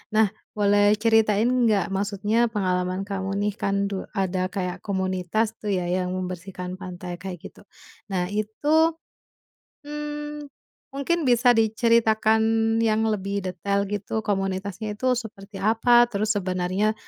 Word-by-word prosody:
Nah, 215 -2 +4 0.3
boleh 205 0 +4
ceritain 225 -1 +3
enggak 235 -6 +2
maksudnya 205 +4 +1
pengalaman 185 -2 -1
kamu 195 -1 -3
nih 205 +1 0
kan 200 0 0
du 195 - -3
ada 185 -1 -1
kayak 180 -2 -3
komunitas 190 +3 -1
itu 210 -1 -3
ya 175 - -3
yang 180 0 0
membersihkan 180 0 -5
pantai 180 -2 -7
kayak 185 -2 -6
gitu, - - -18 0.5
nah 180 -2 0
itu, 295 +11 +2 0.9
mmm, 295 0 -6 0.4
mungkin 295 +5 -1
bisa 245 -2 +4
diceritakan 220 -1 +3 0.4
yang 220 -1 +2
lebih 200 -2 -2
detail 200 +2 -1
gitu 205 +2 -3
komunitasnya 200 +1 -2
itu 255 +2 +2
seperti 205 -3 -8
apa? 240 +3 +5
Terus 215 0 0
sebenarnya, 185 +2 0
205 Hz, 125 wpm, -24 LUFS, 190-225 Hz, 0.9 s, apa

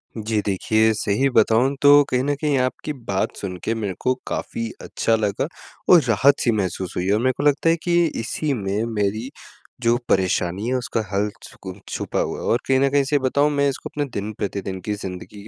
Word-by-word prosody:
जी, 110 -1 -1
देखिए 110 +3 +2
सही 110 +6 +1
बताऊँ 120 +3 +3
तो 145 0 +7
कहीं 125 0 +1
न 145 +1 +1
कहीं 150 -3 +1
आपकी 130 +4 -2
बात 95 -1 -1
सुन 95 -2 -5
के 115 - 0
मेरे 105 -4 -3
को 130 - +1
काफ़ी 115 0 -3
अच्छा 115 - 0
लगा 105 +4 -1 0.5
और 175 - +8
राहत 125 +4 +3
सी 120 - +2
महसूस 95 -4 -2
हुई 90 - -1
है 100 - +2
और 105 - +2
मेरे 130 +1 +3
को - - -2
लगता 145 +2 +3
है 165 - +4
कि 175 -1 +3
इसी 140 +6 -2
में 100 -2 -2
मेरी, 105 +4 -1 0.5
जो 120 0 +3
परेशानी 95 +2 +1
है, 130 - 0
उसका 120 -2 -1
हल 100 +2 +1
छुकू 95 -1 -9 0.2
छुपा - - -3
हुआ - - -2
है - - -6
और 120 - +2
कहीं 130 -1 +3
न 140 +1 +3
कहीं 140 0 +3
सही 145 +1 +1
बताऊँ, 140 +3 +2
मैं 140 -1 +2
इसको 135 - -5
अपने 145 -1 -2
दिन-प्रतिदिन 100 -2 -4
की 105 - -1
ज़िंदगी 100 +1 -8
115 Hz, 205 wpm, -22 LUFS, 100-135 Hz, 0.5 s, और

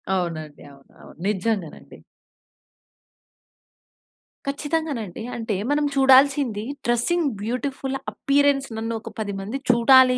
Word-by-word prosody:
అవునండి. 155 -5 -4
అవును. 140 0 -20
అవును. - - -15
నిజంగానండి. 210 -4 -2 2.5
ఖచ్చితంగానండి. 285 - -2
అంటే 225 -3 -2 0.2
మనం 295 0 +2
చూడాల్సింది 270 -4 +4 0.2
డ్రెసింగ్ 285 +8 +2
బ్యూటిఫుల్ 265 +4 -3 0.2
అప్పియరెన్స్ 280 -1 +2
నన్ను, 225 +1 -3
ఒక - - -8
10 205 -2 -2
మంది 215 +8 -4
చూడాలి, 250 +1 +6
245 Hz, 95 wpm, -23 LUFS, 210-275 Hz, 2.5 s, చూడాలి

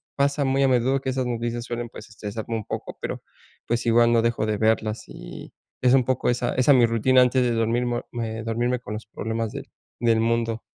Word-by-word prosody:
pasa 140 +1 +1
muy 135 +1 +2
a - - +4
menudo 130 +2 +2
que 130 - -3
esas 130 -1 -1
noticias 120 0 -2
suelen 120 -1 -4
pues 110 - -11
estresarme 110 +1 -5
un 110 - -4
poco, - - -6
pero, - - -4 0.5
pues, 120 0 -1
igual 120 0 +4
no 115 -1 +4
dejo 115 -2 0
de 105 -1 -1
verlas 110 0 +1
y - - -10 0.3
es 125 0 +4
un 130 -2 +5
poco 130 - 0
esa 120 0 0
esa 135 +3 +5
mi 125 -3 +6
rutina 115 +3 +4
antes 125 +1 +3
de 120 - +1
dormirmo 120 +1 0
me 115 -2 -4
dormirme 120 +2 -1
con 105 -3 -7
los 105 0 -6
problemas 110 +1 -3
del - - -7 0.3
del 115 -1 +3
mundo. 115 0 0
120 Hz, 210 wpm, -24 LUFS, 115-125 Hz, 0.5 s, mi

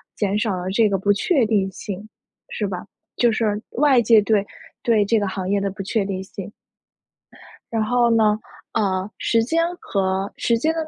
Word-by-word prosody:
减 205 -1 0
少 210 -2 0
了 180 0 -4
这 215 +3 +3
个 195 -2 0
不 200 +2 +2
确 240 - +2
定 200 -3 +1
性， 200 +2 -7 0.4
是 210 - -2
吧？ 185 -2 -5 0.3
就 240 -1 +3
是 215 -2 0
外 270 -2 +4
界 220 -1 +6
对 205 -1 +1 0.4
对 225 -3 +3
这 220 +2 +2
个 205 - -1
行 190 0 -4
业 200 0 +2
的 195 0 -2
不 195 +1 -7
确 195 +1 -1
定 190 -1 -3
性。 195 0 -8 1.2
然 225 -1 +1
后 240 +2 +2
呢， 220 -2 +3 0.4
呃， 195 -2 0
时 230 -1 +2
间 325 +8 +1 0.2
和 190 0 -1
时 235 - +1
间 315 +7 +1
210 Hz, 195 characters per minute, -22 LUFS, 195-230 Hz, 1.2 s, 界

